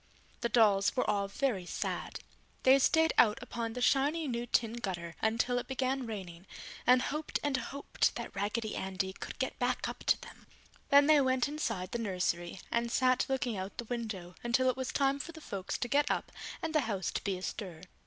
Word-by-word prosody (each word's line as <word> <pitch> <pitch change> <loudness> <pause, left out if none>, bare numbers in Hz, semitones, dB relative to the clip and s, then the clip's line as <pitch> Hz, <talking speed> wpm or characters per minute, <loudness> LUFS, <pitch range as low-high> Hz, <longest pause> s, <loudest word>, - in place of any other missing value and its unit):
The 235 - -1
dolls 205 -4 +4
were 255 - +1
all 200 -1 +1
very 200 -4 -1
sad. - - -3 0.4
They 265 +1 +7
stayed 320 +4 +4
out 210 -1 +6
upon 230 -2 -4
the 250 - -5
shiny 290 +5 +2
new 240 -1 -2
tin 230 -1 +1
gutter 180 -8 -4
until 230 +3 +1
it 245 - -7
began 265 -1 -1
raining 185 -4 -7 0.4
and 250 0 +6
hoped 300 +1 -2
and 290 -2 +1
hoped 280 +1 -1
that - - -6
Raggedy 210 +2 -2
Andy 190 0 -2
could - - -8
get 265 - -3
back 250 0 0
up - - -6
to - - +4
them. - - -13 0.4
Then 285 0 +7
they 300 -1 +6
went 260 -1 +2
inside 225 - -3
the 235 - -2
nursery 180 -4 -1
and 235 0 0
sat 255 0 +3
looking 255 -4 0
out 190 +1 -5
the 240 - -4
window 205 -7 -5
until 255 +2 +3
it - - -9
was 260 -1 -3
time 275 0 +2
for 335 +4 -6
the 320 - -10
folks 195 -10 -4
to 245 - -2
get 285 +4 +2
up - - -1 0.3
and 320 -1 -2
the 310 - +4
house 195 -3 -1
to - - -3
be 195 -2 -1
astir. 185 -2 -6
235 Hz, 200 wpm, -32 LUFS, 200-265 Hz, 0.4 s, They